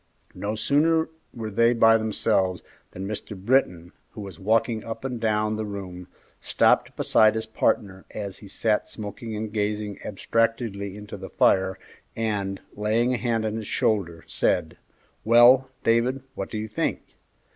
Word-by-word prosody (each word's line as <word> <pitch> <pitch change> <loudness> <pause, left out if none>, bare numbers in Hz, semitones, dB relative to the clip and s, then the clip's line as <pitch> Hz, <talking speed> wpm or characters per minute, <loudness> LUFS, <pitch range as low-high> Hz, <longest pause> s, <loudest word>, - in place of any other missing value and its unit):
No 105 +2 -3
sooner 160 +7 +2 0.2
were 110 -2 -6
they 115 +3 +3
by 115 -1 +6
themselves 100 -4 0 0.3
than 95 +2 -6
Mr. 105 0 -6
Britton, 95 -6 +1 0.2
who 110 - -8
was 95 -5 -9
walking 110 +2 +1
up 115 +2 -6
and 125 -3 -3
down 110 -1 0
the 110 - -2
room, 95 -4 -7 0.3
stopped - - +2
beside 110 0 +4
his 110 0 -2
partner 100 -3 -1
as 100 -3 -6
he 105 - -12
sat 105 +2 0
smoking 110 +1 -7
and 105 0 -5
gazing 105 -1 -2
abstractedly 105 -1 -1
into 105 0 -8
the 95 0 -8
fire, 95 0 +2 0.4
and, 100 -3 -2
laying 110 +4 +1
a - - 0
hand 115 -3 -1
on 110 0 -2
his 110 -2 -6
shoulder, 85 -7 0
said, 80 -3 0 0.5
"Well, 120 +3 +6
Dave, 120 +3 +2
what 95 - -5
do - - -5
you 110 +1 -3
think? 105 - -2
110 Hz, 155 wpm, -25 LUFS, 100-115 Hz, 0.5 s, by